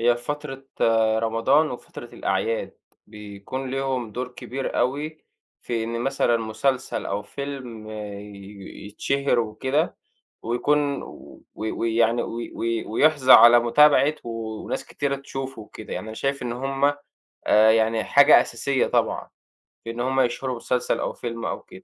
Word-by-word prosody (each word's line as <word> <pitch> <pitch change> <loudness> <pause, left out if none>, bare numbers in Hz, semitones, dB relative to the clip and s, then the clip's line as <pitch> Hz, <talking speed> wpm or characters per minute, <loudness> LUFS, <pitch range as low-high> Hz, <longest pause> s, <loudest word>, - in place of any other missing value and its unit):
هي 120 +1 +3
فترة 135 +2 -6 0.6
رمضان 115 +7 +2
وفترة 120 - -9
الأعياد، 105 +4 -2 0.3
بيكون 105 +5 -7
ليهُم 130 -4 -2
دور 125 +2 -4
كبير 125 +1 -5
أوي 150 +4 -2 0.4
في 115 -2 -2
إن 115 +1 -3
مثلًا 120 -2 +1
مسلسل 115 +4 -2
أو 100 +1 -2
فيلم، 125 -4 -7
ي 100 -1 -9
يتشهر 140 +5 0
وكده، 130 +7 -1 0.5
ويكون 140 +4 0
و - - -13
ويعني، 115 +1 0
و 115 - -6 0.2
و 115 -1 -2
ويحظى 140 0 +4
على 120 0 +9
متابعة 145 +4 +5
و - - -6 0.4
وناس - - -4
كتيرة 140 -1 -2
تشوفه 135 -3 -7
وكده، 110 +1 -10
يعني - - -5
أنا 110 - -7
شايف 140 +4 -2
إن 120 -1 -3
هُم 135 +3 0 0.5
آآ، 110 +1 +6
يعني 110 0 +2
حاجة - - +7
أساسية - - -1
طبعًا، - - 0 0.6
في 115 - -7
إن 115 - -8
هُم 130 +2 0
يشهروا 125 +1 -1
مسلسل 125 +1 -1
أو - - -2
فيلم 115 -1 -5
أو - - -3
كده. - - -15
120 Hz, 140 wpm, -24 LUFS, 110-135 Hz, 0.6 s, على